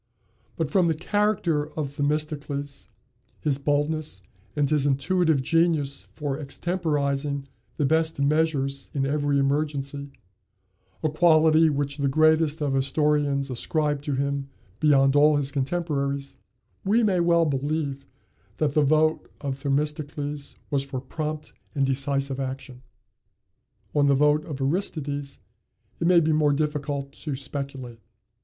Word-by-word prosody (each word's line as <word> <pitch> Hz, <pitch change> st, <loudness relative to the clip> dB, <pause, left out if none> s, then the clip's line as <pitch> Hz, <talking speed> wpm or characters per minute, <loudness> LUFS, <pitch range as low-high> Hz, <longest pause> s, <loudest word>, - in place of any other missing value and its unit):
But, 160 Hz, -3 st, -2 dB
from 185 Hz, -3 st, +3 dB
the 165 Hz, -, +1 dB
character 175 Hz, -4 st, 0 dB
of 145 Hz, -2 st, -3 dB
Themistocles, 145 Hz, -1 st, -3 dB, 0.5 s
his 140 Hz, -3 st, -1 dB
boldness, 145 Hz, -6 st, -1 dB, 0.3 s
and 145 Hz, -1 st, +2 dB
his 145 Hz, -1 st, +1 dB
intuitive 150 Hz, +1 st, +2 dB
genius 155 Hz, -2 st, +1 dB
for 145 Hz, -2 st, -3 dB
extemporizing 145 Hz, -3 st, -1 dB, 0.3 s
the 145 Hz, -, +1 dB
best 160 Hz, +1 st, +1 dB
measures 140 Hz, -2 st, 0 dB
in 135 Hz, -1 st, +1 dB
every 145 Hz, 0 st, +1 dB
emergency 140 Hz, 0 st, -1 dB, 0.9 s
a 155 Hz, -, +2 dB
quality 160 Hz, 0 st, +5 dB
which 140 Hz, -1 st, -2 dB
the 140 Hz, -1 st, 0 dB
greatest 155 Hz, +2 st, +3 dB
of 140 Hz, -2 st, 0 dB
historians 140 Hz, 0 st, +1 dB
ascribes 145 Hz, +3 st, -1 dB
to 145 Hz, -, -1 dB
him 140 Hz, 0 st, -2 dB, 0.3 s
beyond 135 Hz, -2 st, +4 dB
all 150 Hz, +1 st, +6 dB
his 140 Hz, -1 st, -1 dB
contemporaries 140 Hz, -1 st, -2 dB, 0.5 s
we 220 Hz, +4 st, +3 dB
may 195 Hz, -4 st, +2 dB
well 170 Hz, -1 st, +4 dB
believe 140 Hz, -1 st, -2 dB, 0.5 s
that 150 Hz, -2 st, 0 dB
the 150 Hz, -, +3 dB
vote 155 Hz, +2 st, +2 dB
of 140 Hz, -2 st, -4 dB
Themistocles 145 Hz, 0 st, -2 dB, 0.2 s
was 140 Hz, -2 st, +1 dB
for 135 Hz, -2 st, -5 dB
prompt 155 Hz, +3 st, -5 dB, 0.2 s
and 140 Hz, -1 st, +2 dB
decisive 135 Hz, 0 st, -1 dB
action. 130 Hz, -1 st, -5 dB, 1.1 s
On 145 Hz, -1 st, +3 dB
the 140 Hz, -, +4 dB
vote 150 Hz, +2 st, +3 dB
of 145 Hz, -4 st, -6 dB
Aristides 145 Hz, -2 st, -2 dB, 0.6 s
it 170 Hz, -, +1 dB
may 180 Hz, -1 st, +6 dB
be 160 Hz, -1 st, +1 dB
more 150 Hz, -1 st, +3 dB
difficult 145 Hz, -2 st, -2 dB
to 145 Hz, 0 st, -5 dB
speculate. 135 Hz, -3 st, -6 dB
145 Hz, 130 wpm, -25 LUFS, 140-155 Hz, 1.1 s, all